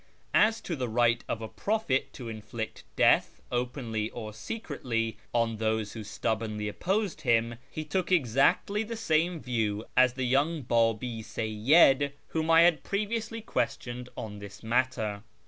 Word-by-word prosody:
As 220 +1 +4
to 170 - -3
the 125 -4 -3
right 120 +1 +2
of 115 - -2
a - - -4
prophet 200 - -1
to 125 - -8
inflict 110 +1 -6
death, - - +3
openly 120 -3 -2
or 110 -3 -7
secretly, 115 - -3
on 115 -2 +1
those 110 -1 -1
who 110 - -6
stubbornly 105 0 -2
opposed 190 - -1
him, 115 -3 +2 0.2
he 155 - -5
took 180 +4 -1
exactly 165 - +3
the 225 +1 -4
same 170 -4 +1
view 110 -5 -1
as 125 -1 +5
the 130 0 -2
young 145 +5 +1
Babi 115 0 +1
Seyyid 135 +7 +3 0.2
whom 160 0 -1
I 165 0 +7
had 170 -2 +5
previously 220 +2 -2
questioned 125 - -3
on 105 -2 -6
this 100 +1 -10
matter. 110 -3 0
125 Hz, 145 wpm, -29 LUFS, 110-160 Hz, 0.2 s, I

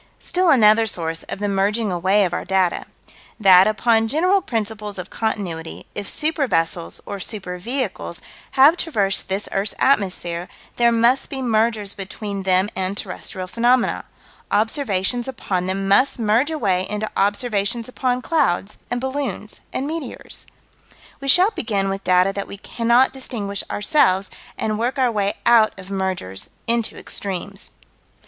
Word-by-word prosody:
Still 365 -1 +1
another 225 -4 +5
source 165 -4 -2
of - - -3
the 205 +1 -2
merging 200 +2 0
away 190 +3 +2
of 175 - -3
our - - -2
data: 190 -2 +1 0.5
That, 190 -2 +7
upon 225 +1 +2
general 365 - +2
principles 215 - -4
of 180 -1 -7
Continuity, 180 -7 -4
if 205 -1 -4
super 305 -2 0
vessels, 165 -4 -1
or 200 - -5
super 190 -3 -4
vehicles, 255 +7 -3 0.3
have 290 +5 +6
traversed 205 - 0
this 195 +2 -1
earth's 195 +2 -1
atmosphere, 180 -8 +1 0.3
there 235 -1 +4
must 235 +3 +2
be 270 - -5
mergers 220 -4 +1
between 200 0 -5
them 190 0 +2
and 190 +1 -2
terrestrial 185 -1 -5
phenomena: 240 +5 +1 0.4
observations 225 0 0
upon 190 -8 -2
them 195 +1 -2
must 225 +9 +4
merge 230 +5 +2
away 190 - 0
into 210 +1 -2
observations 205 +2 0
upon 255 -1 -1
clouds 210 - 0
and 245 - -1
balloons 265 -5 -4
and 265 - -2
meteors. 305 -4 -6 0.7
We 275 - -7
shall 360 - +6
begin 200 - -1
with 195 0 -4
data 185 +1 +3
that 200 0 -4
we 200 - -8
cannot 235 +5 +2
distinguish 215 -7 -3
ourselves 205 - +2 0.3
and 215 0 -1
work 245 +4 -1
our 255 -2 +2
way 205 -2 0
out 230 -4 +5
of 190 0 -10
mergers 190 - -3 0.2
into 235 -1 0
extremes. 195 0 -5
210 Hz, 145 wpm, -21 LUFS, 195-245 Hz, 0.7 s, That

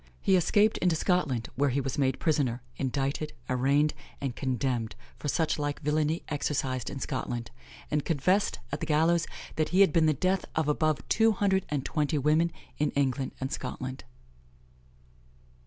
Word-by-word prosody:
He 195 - +3
escaped 205 +5 +3
into 175 -2 +2
Scotland, 155 -9 0
where 140 +1 +2
he 130 +2 0
was 135 +1 -3
made 130 -2 +1
prisoner, 130 -6 0
indicted, 140 +3 -2
arraigned, 140 +4 +2 0.3
and 135 -4 -3
condemned 125 -3 -1 0.2
for - - -4
such 155 +2 +1
like 145 -1 -2
villany 155 +2 +1
exercised 135 -4 -1
in 140 - -6
Scotland, 120 -2 -3 0.4
and 150 -1 +1
confessed 180 +6 +1
at 145 - -2
the 160 - -4
gallows 165 +2 +3 0.3
that 155 -1 +1
he 185 +2 +4
had 190 -6 +5
been 160 -1 +4
the 155 - +4
death 185 +6 +1
of 160 -1 +1
above 155 0 +1
two 225 0 +4
hundred 190 -1 +1
and 145 -3 -2
twenty 150 0 0
women 155 +4 +3 0.3
in 150 - +2
England 135 -1 0
and 130 0 -3
Scotland." 130 0 -5
150 Hz, 160 wpm, -29 LUFS, 135-160 Hz, 0.4 s, had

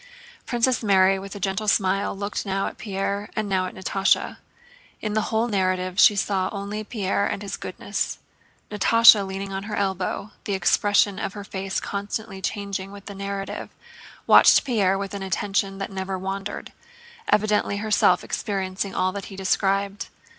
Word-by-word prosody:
Princess 245 +1 +1
Mary 195 -2 +4
with 195 +1 -8
a - - -6
gentle 195 +3 -2
smile 195 -1 +1
looked 200 +1 -3
now 195 -1 -1
at - - -6
Pierre 200 0 -3
and 215 -2 -1
now 190 -2 0
at - - -9
Natásha. 195 +1 +1 0.6
In 215 -1 -3
the 215 0 0
whole 225 +1 +1
narrative 185 -2 0
she 210 - +7
saw 195 -2 0
only 205 +1 -4
Pierre 200 -2 -1
and 205 - -4
his 200 - -4
goodness. - - -4 0.5
Natásha, 225 0 +6
leaning 195 0 -5
on 195 +1 -4
her 210 0 -4
elbow, 195 +1 -2
the 200 - -1
expression 200 +2 +2
of - - -3
her 205 - -7
face 195 -1 -3
constantly 200 0 -5
changing 200 -1 -4
with 200 -1 -11
the 200 - -7
narrative, 195 0 -5 0.6
watched - - +7
Pierre 200 -7 +2
with 195 0 -5
an 200 - -5
attention 195 0 -1
that 195 0 -5
never 190 0 -3
wandered—evidently 210 - -2
herself 210 -4 +3
experiencing 195 -2 -3
all 185 0 +1
that 200 0 -6
he 195 - -10
described. 195 +1 0
200 Hz, 160 wpm, -24 LUFS, 190-210 Hz, 0.6 s, she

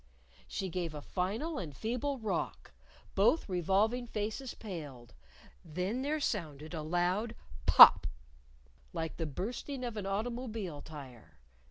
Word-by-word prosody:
She 195 - -3
gave 170 -3 -3
a 150 - -5
final 220 - -2
and 150 -7 -6
feeble 250 +5 -1
rock. 220 -4 -3 0.4
Both 330 - +3
revolving 200 +7 +1
faces 220 +4 -3
paled. 145 - -8 0.5
Then 180 +9 -2
there 300 +3 0
sounded 160 - -3
a 160 - -3
loud 180 +8 0 0.3
pop - - +10 0.9
like 160 0 -3
the 165 - -2
bursting 245 - -4
of 235 -3 -4
an 200 -2 -3
automobile 215 - -3
tire. 125 - -11
195 Hz, 125 wpm, -33 LUFS, 160-235 Hz, 0.9 s, pop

